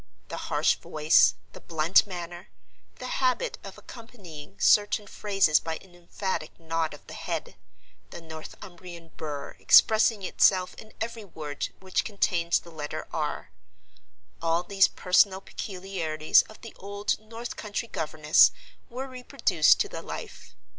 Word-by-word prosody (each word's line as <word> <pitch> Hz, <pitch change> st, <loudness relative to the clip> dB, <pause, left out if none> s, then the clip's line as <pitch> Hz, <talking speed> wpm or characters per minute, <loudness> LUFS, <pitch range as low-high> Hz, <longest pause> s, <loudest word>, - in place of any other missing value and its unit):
The -, -, -6 dB
harsh -, -, +2 dB
voice, 155 Hz, +1 st, +4 dB, 0.2 s
the -, -, -11 dB
blunt 165 Hz, +4 st, +3 dB
manner, 175 Hz, -2 st, -7 dB, 0.5 s
the 255 Hz, -, -8 dB, 0.2 s
habit 270 Hz, -, 0 dB
of -, -, -10 dB
accompanying 195 Hz, -, -12 dB
certain 210 Hz, 0 st, +4 dB
phrases 195 Hz, -7 st, +2 dB
by 160 Hz, -1 st, -4 dB
an 185 Hz, -2 st, -18 dB
emphatic 175 Hz, -1 st, -5 dB
nod 165 Hz, -2 st, -2 dB
of 145 Hz, -, -18 dB
the -, -, -10 dB
head, -, -, -5 dB, 0.5 s
the -, -, -9 dB
Northumbrian 170 Hz, +1 st, -11 dB
burr 150 Hz, -3 st, -6 dB
expressing 220 Hz, -1 st, +5 dB
itself 185 Hz, 0 st, +3 dB
in 220 Hz, -, -14 dB
every 230 Hz, 0 st, -4 dB
word 155 Hz, -6 st, -5 dB
which 190 Hz, -1 st, -1 dB
contained 175 Hz, -5 st, -1 dB
the 170 Hz, -, +1 dB
letter 155 Hz, 0 st, -6 dB
"r"—all 95 Hz, -, -5 dB
these 195 Hz, +1 st, +4 dB
personal 190 Hz, +1 st, +3 dB
peculiarities 180 Hz, -6 st, 0 dB
of 215 Hz, -, -14 dB
the 230 Hz, -, -10 dB
old 200 Hz, +1 st, -2 dB
North 230 Hz, +2 st, -8 dB
country 210 Hz, +2 st, -4 dB
governess 155 Hz, -4 st, +4 dB, 0.4 s
were 260 Hz, +2 st, -5 dB
reproduced 250 Hz, -, +2 dB
to -, -, 0 dB
the -, -, -7 dB
life. 90 Hz, -, -9 dB
175 Hz, 135 wpm, -27 LUFS, 155-205 Hz, 0.5 s, expressing